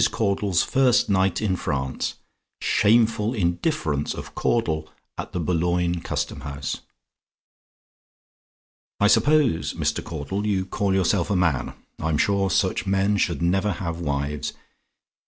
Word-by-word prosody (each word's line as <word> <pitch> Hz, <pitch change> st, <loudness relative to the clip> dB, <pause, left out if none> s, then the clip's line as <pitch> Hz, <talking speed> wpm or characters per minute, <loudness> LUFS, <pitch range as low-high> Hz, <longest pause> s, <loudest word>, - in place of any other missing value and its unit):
CAUDLE'S 100 Hz, -4 st, +1 dB
FIRST 130 Hz, -3 st, +3 dB
NIGHT 95 Hz, +1 st, +2 dB
IN 95 Hz, -3 st, +1 dB
FRANCE 70 Hz, -7 st, -2 dB, 0.4 s
"SHAMEFUL 115 Hz, +1 st, +3 dB
INDIFFERENCE" 85 Hz, -, -1 dB
OF -, -, -8 dB
CAUDLE 80 Hz, -9 st, 0 dB, 0.3 s
AT -, -, -5 dB
THE 90 Hz, -, -3 dB
BOULOGNE 85 Hz, +1 st, 0 dB
CUSTOM 75 Hz, -2 st, -3 dB
HOUSE 70 Hz, -1 st, -5 dB, 2.2 s
"I 105 Hz, -, +3 dB
suppose, 120 Hz, -, +3 dB
Mr. -, -, -1 dB
Caudle, 95 Hz, +7 st, -4 dB
you 95 Hz, -2 st, 0 dB
call 95 Hz, 0 st, 0 dB
yourself 95 Hz, -1 st, +1 dB
a 100 Hz, -, +1 dB
man? 85 Hz, -7 st, 0 dB, 0.2 s
I'm 80 Hz, -1 st, 0 dB
sure 100 Hz, +3 st, +2 dB
such 95 Hz, -1 st, 0 dB
men 100 Hz, +1 st, +2 dB
should 85 Hz, -4 st, 0 dB
never 95 Hz, +4 st, +1 dB
have 85 Hz, -4 st, -4 dB
wives. 70 Hz, -2 st, -2 dB
95 Hz, 120 wpm, -24 LUFS, 80-105 Hz, 2.2 s, FIRST